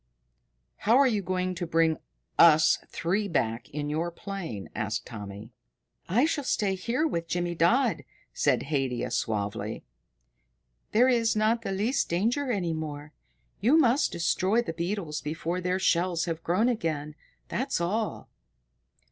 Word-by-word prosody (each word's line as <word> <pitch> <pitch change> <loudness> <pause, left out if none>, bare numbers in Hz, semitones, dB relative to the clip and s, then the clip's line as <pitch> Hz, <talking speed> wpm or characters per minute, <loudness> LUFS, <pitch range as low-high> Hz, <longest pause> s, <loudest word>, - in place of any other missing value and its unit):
"How 225 +4 +3
are 280 - +6
you 215 -5 +1
going 185 0 -1
to 175 -1 -4
bring 165 -1 +2 0.4
us 160 -2 +7
three 200 +5 -1
back 120 - -1
in 145 0 -4
your 160 +3 -1
plane?" 170 - -6
asked 110 +3 -3
Tommy. 105 0 -8 0.6
"I 235 - +4
shall 310 -2 -1
stay 205 -6 0
here 235 +11 -1
with 170 - -2
Jimmydodd," 175 - +1 0.3
said 135 -4 +2
Haidia 135 -4 -1
suavely. 105 0 -2 1.1
"There 240 +4 +5
is 235 -3 +2
not 220 +2 +2
the 225 - -4
least 210 +7 0
danger 235 +10 0
any 180 -7 -1
more. 150 -1 -6 0.5
You 245 +10 +4
must 270 -2 +3
destroy 190 +6 +1
the 165 - -4
beetles 170 -2 -3
before 165 +4 -3
their 180 +1 0
shells 175 -2 +1
have 165 -2 -3
grown 185 +8 +2
again, 155 -10 -2 0.3
that's 260 -4 -1
all." 210 +6 -2
175 Hz, 140 wpm, -28 LUFS, 150-215 Hz, 1.1 s, us